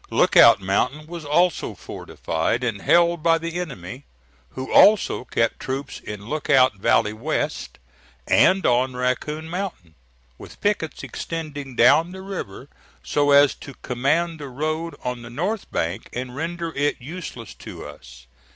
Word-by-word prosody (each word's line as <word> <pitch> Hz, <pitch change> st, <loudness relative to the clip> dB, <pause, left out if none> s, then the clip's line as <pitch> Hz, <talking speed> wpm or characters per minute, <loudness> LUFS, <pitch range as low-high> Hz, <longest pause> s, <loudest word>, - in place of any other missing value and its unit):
Lookout -, -, +6 dB
Mountain 125 Hz, +10 st, -1 dB
was 170 Hz, -1 st, -8 dB
also 170 Hz, +3 st, +1 dB
fortified 80 Hz, +9 st, -3 dB
and 110 Hz, -5 st, -2 dB
held 170 Hz, -1 st, +3 dB
by 165 Hz, 0 st, +4 dB
the 165 Hz, +1 st, -4 dB
enemy, 130 Hz, -, -7 dB, 0.5 s
who 130 Hz, 0 st, -5 dB
also 205 Hz, -10 st, +5 dB
kept 115 Hz, -2 st, 0 dB
troops 135 Hz, +1 st, -5 dB
in 105 Hz, -1 st, -8 dB
Lookout 130 Hz, -3 st, +2 dB
valley 105 Hz, +2 st, +2 dB
west, 145 Hz, +5 st, -3 dB, 0.5 s
and 190 Hz, +1 st, +4 dB
on 125 Hz, +1 st, +2 dB
Raccoon 140 Hz, +5 st, -2 dB
Mountain, 175 Hz, -, -5 dB, 0.5 s
with -, -, -12 dB
pickets 205 Hz, -6 st, -1 dB
extending 145 Hz, -5 st, -6 dB
down 155 Hz, +10 st, +5 dB
the 190 Hz, 0 st, -9 dB
river 140 Hz, -, -7 dB, 0.4 s
so 145 Hz, -1 st, +1 dB
as 140 Hz, 0 st, +6 dB
to 140 Hz, -, -10 dB
command 150 Hz, +7 st, 0 dB
the 145 Hz, -2 st, -7 dB
road 155 Hz, +5 st, -3 dB
on 125 Hz, -1 st, -3 dB
the 115 Hz, -, -10 dB
north 185 Hz, -, -3 dB
bank 85 Hz, +3 st, -3 dB
and 125 Hz, 0 st, -5 dB
render 165 Hz, +2 st, -4 dB
it 145 Hz, +1 st, 0 dB
useless 130 Hz, -, -8 dB
to -, -, -10 dB
us. 60 Hz, 0 st, -13 dB
145 Hz, 140 wpm, -23 LUFS, 125-165 Hz, 0.5 s, Lookout